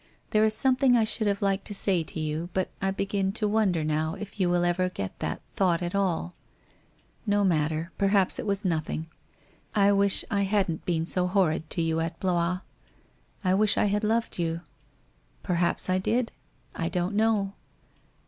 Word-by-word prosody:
There 215 0 +4
is 220 0 +3
something 255 -1 +4
I 225 - +3
should 215 0 +1
have 200 0 0
liked 195 0 0
to 205 - -2
say 190 -3 +2
to 160 - -6
you, 155 +2 -3
but 185 -1 -1
I 195 - +1
begin 195 0 -1
to 215 0 0
wonder 205 -6 +1
now 155 +1 -1
if 210 0 -9
you 180 -2 +2
will 175 0 +2
ever 185 +1 +1
get 95 - -6
that - - -3
thought 180 -3 +1
at 175 +2 -3
all? 180 -3 0 0.9
No 205 0 +2
matter, 160 -1 0
perhaps 195 -1 +2
it - - -4
was 200 0 -1
nothing. 160 -2 -1 0.7
I 200 -1 +5
wish 200 -1 +3
I 200 - +1
hadn't 195 -4 0
been 165 -2 0
so 180 +1 0
horrid 170 -5 +1
to 170 - 0
you 165 0 0
at 165 0 -3
Blois. 180 0 0 0.8
I 185 -1 +2
wish 205 +2 +2
I - - +3
had 205 +1 0
loved 225 -2 0
you? 165 0 -1 0.8
Perhaps 175 -1 +1
I 185 0 +2
did? 230 +5 0 0.4
I 165 -1 -2
don't 180 +2 -1
know. 210 -2 +1
190 Hz, 180 wpm, -27 LUFS, 170-205 Hz, 0.9 s, I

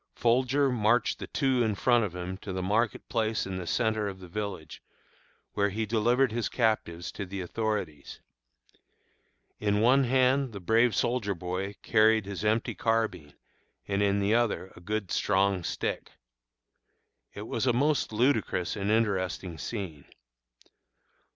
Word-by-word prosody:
Folger 130 +3 +2
marched 115 0 +2
the - - -6
two 135 -3 +1
in 110 -3 +1
front 120 +2 +3
of 95 -4 -4
him 90 +1 -4
to 100 - -7
the 95 0 -3
market 105 +3 0
place 110 -1 0
in 95 -1 -4
the 90 -2 -6
centre 110 +3 0
of 95 -1 -6
the 90 - -11
village, 95 -5 -6 0.7
where 100 0 +1
he 110 +3 -2
delivered 120 +4 +2
his 115 0 -2
captives 110 -8 -1
to - - -5
the 95 +1 -6
authorities. 95 -6 -3 1.4
In 105 -1 +1
one 130 +5 +4
hand 130 0 +2
the 100 - -6
brave 115 +5 +3
soldier 110 -5 0
boy 90 +3 -4
carried 110 -1 +4
his 100 0 -5
empty 110 +2 +1
carbine, 110 -10 -1 0.5
and 100 0 0
in 100 0 +2
the 100 +2 +1
other 115 -5 0
a - - -12
good 105 +1 -3
strong 95 -2 +1
stick. - - -3 1.2
It 105 - -6
was 115 +3 -2
a - - +5
most 140 +3 +1
ludicrous 110 -6 +1
and 100 -1 -2
interesting 95 -6 0
scene. 90 -11 -5
105 Hz, 150 wpm, -28 LUFS, 95-115 Hz, 1.4 s, a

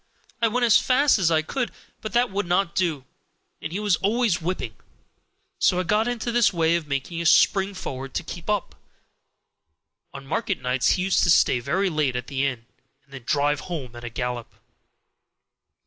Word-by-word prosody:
I 230 - +4
went 240 +2 +1
as 230 - +6
fast 265 -2 +3
as 175 -3 +3
I 160 -1 +2
could, 250 - -3 0.3
but 215 - -5
that 240 -1 +2
would 200 -1 -2
not 180 0 +1
do, 160 -8 -1 0.6
and - - -5
he 190 - -3
was 205 -4 +2
always 210 -3 +1
whipping; 165 -9 -3 0.9
so 180 - +3
I - - 0
got 210 +5 +1
into 240 -1 -2
this 235 -1 +3
way 165 -2 +2
of 165 -3 -3
making 145 +4 -3
a - - -4
spring 195 +3 +4
forward 135 -5 -6
to - - -1
keep 175 +2 -8
up. 210 -3 -1 1.4
On 140 -1 -10
market 195 +6 -2
nights 125 0 +1
he 180 - -1
used 190 0 +2
to - - +2
stay 130 -6 +4
very 180 +10 0
late 150 -5 0
at 125 - -3
the 135 -1 -2
inn, 120 -4 -5 0.4
and 140 0 -23
then 130 -4 -10
drive 145 0 +1
home 140 -9 -6
at 120 - -10
a 120 - -5
gallop. 125 0 -5
170 Hz, 190 wpm, -24 LUFS, 140-205 Hz, 1.4 s, as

